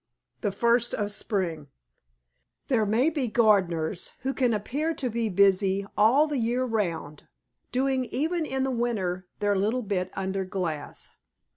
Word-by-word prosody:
THE 205 - -1
FIRST 235 +3 +2
OF 205 -1 -2
SPRING 175 -8 -2 1.0
There 225 -6 +2
may 245 +9 +3
be 285 -5 -1
gardeners 190 -7 +1
who 265 +1 -1
can 250 -3 +2
appear 285 +10 -1
to 255 -4 -2
be 230 0 -1
busy 195 0 +3
all 245 +8 +5
the 295 -3 -2
year 240 +2 0
round 170 - -3 0.4
doing 260 0 +1
even 320 +7 -1
in 265 -3 -1
the 265 - 0
winter, 195 -7 -2
their 205 0 +2
little 220 +6 0
bit 190 -3 -1
under 190 0 -2
glass. 180 -5 -4
215 Hz, 145 wpm, -27 LUFS, 190-255 Hz, 1.0 s, all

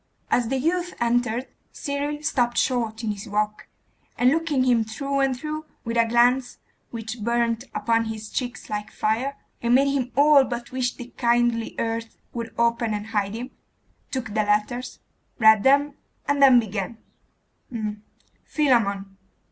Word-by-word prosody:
As 240 -2 +2
the 265 +3 0
youth 350 +6 -1
entered, 240 +1 +1 0.3
Cyril 290 0 -3
stopped 245 -5 +1
short 235 -3 0
in 220 - 0
his 205 +1 -7
walk, 210 +1 -1 0.5
and 250 +1 +4
looking 315 -4 +1
him 240 -3 +3
through 275 +6 -3
and 270 -2 +1
through, 310 +2 -5 0.2
with 230 0 -3
a 230 -1 +4
glance 245 +2 +3 0.3
which 225 -1 -6
burnt 235 +1 0
upon 230 0 +1
his 220 -1 -6
cheeks 245 -2 -4
like 210 0 -4
fire, 250 +6 -1 0.2
and 235 +1 +3
made 275 +1 +4
him 255 -3 -1
all 285 0 +6
but 240 -2 -5
wish 255 -1 -1
the 245 0 -10
kindly 235 -1 +1
earth 230 0 -3 0.2
would 230 -1 -5
open 235 -1 +1
and 205 0 -4
hide 205 0 0
him, 250 +3 -6 0.6
took 260 -4 -3
the 215 +1 +1
letters, 210 +4 -1 0.4
read 220 -2 +6
them, 280 +4 +4 0.3
and 285 0 +1
then 260 -3 +8
began 215 0 -4 1.5
'Philammon. 200 -9 +1
240 Hz, 150 wpm, -24 LUFS, 225-265 Hz, 1.5 s, then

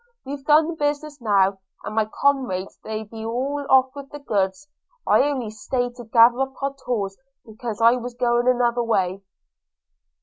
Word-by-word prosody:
We've 275 +1 -6
done 305 +2 +5
the 335 - -3
business 295 -1 -3
now, 195 -3 +2 0.2
and - - -5
my 220 0 +2
comrades 245 -6 -1
they 220 0 -4
be 220 +1 -9
all 265 +6 -2
off 265 0 +5
with 280 -1 -9
the 295 - -8
goods 210 0 -2 0.2
– - - -41
I - - +5
only 265 -6 -1
staid 245 +3 -2
to 240 - -9
gather 235 +2 +5
up 270 0 -1
our 275 0 -1
tools, 200 -6 -2 0.3
because 220 0 -6
I 230 +1 +6
be 245 +1 -5
going 240 0 +2
another 245 -1 +2
way.' 195 -5 0
245 Hz, 175 wpm, -23 LUFS, 220-275 Hz, 0.3 s, I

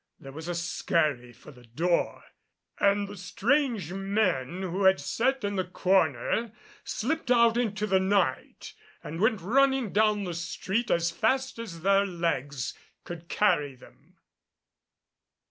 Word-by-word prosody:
There 135 - -10
was 160 +4 -8
a 175 - -2
skurry 155 - -1
for 120 +5 -15
the 125 -3 -17
door 170 +9 -1 0.6
and 200 0 +2
the 205 - -9
strange 210 - 0
men 190 -5 -1
who 190 +2 -1
had 190 0 +5
sat 260 +1 -1
in 200 -1 -2
the 185 - +1
corner 185 - 0 0.3
slipped 285 +3 -3
out 235 -2 +5
into 210 -3 -1
the 190 -2 +2
night 190 -8 -1 0.3
and 165 +3 -6
went 220 -2 +2
running 265 +2 +2
down 210 -1 +2
the 180 -2 -4
street 190 +7 -3
as 170 0 +1
fast 260 +7 0
as 185 -8 -7
their 195 +1 +4
legs 145 -7 -2 0.3
could 170 -1 -9
carry 150 -10 +1
them. - - -20
190 Hz, 140 wpm, -27 LUFS, 170-220 Hz, 0.6 s, had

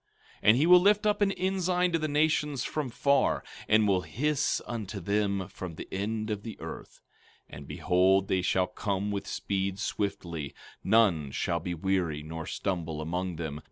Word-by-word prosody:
15:26 - - -29
And 110 +3 +6
he 145 - +3
will 180 +1 +8
lift 205 +2 +4
up 210 0 +2
an 200 -1 +4
ensign 185 -1 0
to 165 - +1
the 155 - -1
nations 150 -2 +1
from 150 -4 -3
far, 140 +3 +2 0.2
and 110 0 +4
will 95 -2 +3
hiss 140 - 0
unto 110 -4 -5
them 100 0 0
from 90 -3 -8
the - - -8
end 110 +3 -2
of 105 -1 -3
the 110 -1 -8
earth; - - -9 0.5
and - - -10
behold, 95 +2 +2
they 95 - +1
shall 90 0 +2
come 100 +2 -2
with 100 -1 -3
speed 95 -1 -2
swiftly; 85 -7 -3 0.3
none 95 -11 +3
shall 85 +5 -1
be 90 +1 -4
weary 85 -4 -1
nor 80 +1 -6
stumble 85 -5 -3
among 90 +3 -3
them. 80 -3 -5
100 Hz, 175 wpm, -29 LUFS, 90-135 Hz, 0.5 s, will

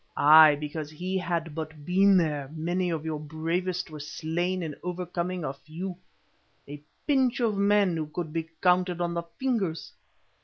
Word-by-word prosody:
Ay, 155 0 +8
because 150 +1 -5
he 180 +5 -4
had 170 -3 -2
but 155 -1 -7
been 195 +3 +5
there 150 -5 0
many 175 +3 -1
of 160 -2 -3
your 155 -2 -2
bravest 165 +4 -3
were 155 - -8
slain 175 +5 -2
in 155 -2 -4
overcoming 180 0 -3
a 135 - -2
few—a 160 -2 -11 0.2
pinch 265 -4 +2
of 225 -4 +1
men 200 -2 +3
who 155 -2 -3
could 155 0 -5
be 165 -1 -3
counted 180 -1 +3
on 175 -1 -1
the 170 - -1 0.2
fingers. 215 -12 -2
170 Hz, 155 wpm, -27 LUFS, 155-185 Hz, 0.2 s, Ay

